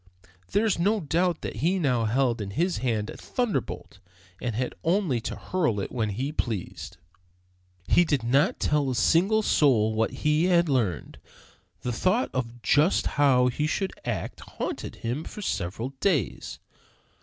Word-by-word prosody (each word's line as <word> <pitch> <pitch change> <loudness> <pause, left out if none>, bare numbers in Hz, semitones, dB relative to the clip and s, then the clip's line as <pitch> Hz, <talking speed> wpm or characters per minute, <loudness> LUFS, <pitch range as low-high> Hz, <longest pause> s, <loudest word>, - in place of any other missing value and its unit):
There 205 +3 +2
is 210 -6 +1
no 210 +5 +2
doubt 170 +1 0
that - - -5
he 170 +10 +1
now 125 -9 +1
held 120 0 +1
in 100 - -4
his 170 - 0
hand 115 -4 -1
a - - -10
thunderbolt, 240 - -3 0.4
and 120 -3 -2
had 125 +2 -2
only 165 - +1
to - - -4
hurl 155 - -1
it 95 - -4
when 115 -4 -1
he 130 +8 -3
pleased. 115 - -4 0.9
He 175 - +5
did 145 -7 0
not 135 +8 +2
tell 145 -2 +1
a 130 - -1
single 190 - +3
soul 115 - +3
what 110 +1 +1
he 150 +2 +1
had 175 -2 +3
learned. 110 - -1 0.6
The 125 - -2
thought 185 - +1
of 120 -2 -4
just 150 +6 +3
how 135 -3 +3
he 150 +5 -1
should 190 +4 -1
act - - -4
haunted - - -5
him 120 +7 -3
for 210 - -8
several 110 - -2
days. 155 - -1
140 Hz, 160 wpm, -26 LUFS, 115-175 Hz, 0.9 s, He